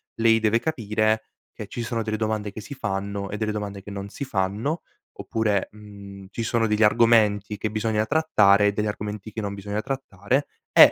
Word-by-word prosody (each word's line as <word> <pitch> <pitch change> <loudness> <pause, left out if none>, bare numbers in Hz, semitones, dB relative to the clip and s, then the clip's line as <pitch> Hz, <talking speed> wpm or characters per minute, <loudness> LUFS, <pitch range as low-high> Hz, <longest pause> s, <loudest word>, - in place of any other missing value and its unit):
lei 115 0 +4
deve 110 +1 +3
capire 110 -6 0 0.3
che 105 - -7
ci 120 +3 -5
sono 115 0 -2
delle 110 -1 -2
domande 110 -1 -1
che 110 - -8
si 125 - -8
fanno 100 -4 -3
e 105 - -4
delle 110 0 -1
domande 100 -2 -5
che 105 - -9
non 100 0 -5
si 140 - -6
fanno, 110 - -1 0.4
oppure, 105 -3 0
mhmm, 100 -2 -11
ci 115 - -3
sono 115 0 +1
degli 105 +1 +2
argomenti 105 -2 +4
che 110 - -2
bisogna 110 0 0
trattare 105 -9 +4
e - - +3
degli 105 +1 -1
argomenti 105 0 -5
che 110 - -3
non 100 -1 -3
bisogna 100 +1 -3
trattare 130 -1 -1 0.2
e - - +10
105 Hz, 190 wpm, -25 LUFS, 100-115 Hz, 0.4 s, e